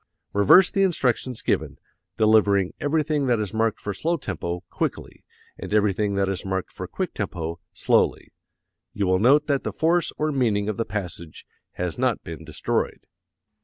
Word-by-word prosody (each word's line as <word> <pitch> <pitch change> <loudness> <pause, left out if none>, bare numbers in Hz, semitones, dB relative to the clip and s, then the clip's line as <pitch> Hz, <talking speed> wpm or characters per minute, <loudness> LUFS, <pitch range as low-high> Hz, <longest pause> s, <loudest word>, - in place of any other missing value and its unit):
Reverse 100 - +6
the 195 - +1
instructions 130 - 0
given, - - -1 0.4
delivering 105 -3 +3
everything 150 -1 0
that 120 -3 +2
is 105 -1 -3
marked 110 -1 0
for 100 - -4
slow 170 - -1
tempo, 90 - -4
quickly; - - -4 0.4
and - - -7
everything 105 -1 +1
that 100 0 +1
is 95 -2 -2
marked 95 -1 -3
for - - -7
quick - - -4
tempo, 85 0 -4
slowly. - - +1 0.6
You 100 - -1
will 95 0 +2
note 140 +7 +5
that 140 -2 0
the - - -2
force 170 +1 +1
or 155 0 0
meaning 110 -7 +1
of 110 - -2
the 115 - -1
passage 90 -6 -6 0.3
has 90 +4 -4
not 130 -3 0
been 80 -1 -8
destroyed. 80 -1 -2
105 Hz, 165 wpm, -24 LUFS, 95-135 Hz, 0.6 s, Reverse